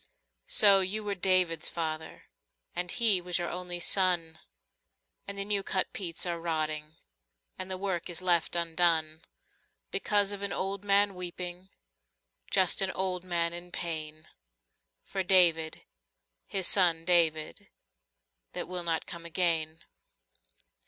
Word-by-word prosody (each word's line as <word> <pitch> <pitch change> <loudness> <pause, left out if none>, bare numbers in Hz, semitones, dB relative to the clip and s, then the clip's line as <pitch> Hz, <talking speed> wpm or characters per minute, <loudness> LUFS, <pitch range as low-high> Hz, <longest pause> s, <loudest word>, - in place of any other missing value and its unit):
lO 200 -2 +8
you 195 +3 -1
were 205 -1 -3
David's 185 -3 +1
father, 160 -1 -6 0.5
And 180 0 -2
he 215 -5 +4
was 180 0 -1
your 175 -1 -3
only 180 -1 -4
son, 175 -3 +1 0.9
And 200 - -5
the 200 - -1
new 205 -1 -1
cut 190 -1 -2
peats 170 -3 -3
are 170 -1 -3
rotting 155 -2 -4 0.6
And 185 0 -3
the 185 - -2
work 185 -3 -4
is 175 -1 -4
left 175 -2 +2
undone. 165 -2 0 0.7
Because 205 -1 +2
of 200 -1 -6
an 200 0 -2
old 195 +1 -4
man 200 0 +2
weeping, 180 0 -7 0.8
Just 190 -2 +3
an 195 - +2
old 185 -1 -2
man 170 -2 -1
in 175 +1 -7
pain. 155 -2 -5 0.8
For 195 - -4
David, 175 -4 +3 0.6
his 190 -2 +1
son 170 -4 +4
David, 165 -3 +2 0.9
That - - -4
will 180 -1 -2
not 165 -1 -2
come 170 -1 -9
again. 165 -2 -1
175 Hz, 130 wpm, -28 LUFS, 165-190 Hz, 0.9 s, lO